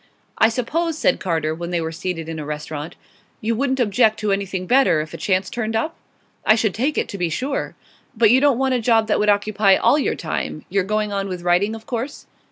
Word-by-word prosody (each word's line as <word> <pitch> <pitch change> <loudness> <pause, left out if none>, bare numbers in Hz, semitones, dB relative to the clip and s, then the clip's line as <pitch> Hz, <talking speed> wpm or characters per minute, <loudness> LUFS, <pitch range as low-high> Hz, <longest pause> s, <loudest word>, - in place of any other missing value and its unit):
'I 220 - +6
suppose,' 315 +8 -1
said - - +2
Carter, 160 -4 -1
when 170 +1 -6
they 175 -1 0
were 160 0 -3
seated 165 -1 -4
in 165 -1 -5
a - - -4
restaurant, 150 +1 -6 0.4
'you 225 +1 -1
wouldn't 265 +2 0
object 220 -1 +3
to 210 -1 0
anything 195 -2 -2
better, 255 - +4
if 155 +1 -5
a - - -5
chance 185 -1 0
turned 225 -2 -3
up?' 310 +9 -1 0.5
'I 215 - +5
should 220 -4 0
take 270 +7 -1
it, - - 0
to 200 - -6
be 175 -1 0
sure.' 265 - -3 0.4
'But 225 -1 +5
you 260 +2 +5
don't 285 -4 +4
want 265 0 +1
a 250 - 0
job 225 -1 +3
that 215 - +1
would 210 - +2
occupy 205 -1 +3
all 295 - +3
your - - 0
time? - - -4
You're 195 -1 +1
going 210 0 -1
on 195 0 -2
with 180 -2 -6
writing, 180 +5 +2
of 220 0 -11
course? 255 +4 -5
210 Hz, 230 wpm, -21 LUFS, 180-240 Hz, 0.5 s, I